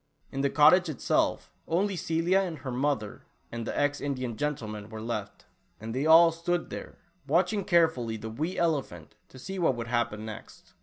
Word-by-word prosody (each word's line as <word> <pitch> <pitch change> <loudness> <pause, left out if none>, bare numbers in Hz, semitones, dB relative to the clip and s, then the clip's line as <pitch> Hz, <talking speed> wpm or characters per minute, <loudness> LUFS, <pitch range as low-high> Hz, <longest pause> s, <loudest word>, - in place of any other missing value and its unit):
In 135 - -2
the 140 - +2
cottage 170 +5 +5
itself, 150 - 0 0.2
only 190 +4 0
Celia 170 +3 +1
and 180 -5 -2
her 130 -1 -6
mother 125 -5 -1 0.3
and 115 -1 -5
the - - -2
ex 145 0 +1
Indian 130 -5 -3
gentleman 110 -7 -4
were 110 -1 -7
left, 110 -3 -5 0.3
and 110 +2 -6
they 135 +5 0
all 165 +1 +8
stood 170 +1 -2
there, - - -8 0.3
watching 180 +7 +2
carefully 160 -11 +2
the 110 +1 -7
wee 155 +10 -3
elephant, 140 - -1 0.2
to - - -14
see 190 +9 -6
what 165 -7 +2
would 115 -1 -5
happen 120 -3 -1
next. 110 -1 -10
145 Hz, 175 wpm, -28 LUFS, 115-165 Hz, 0.3 s, all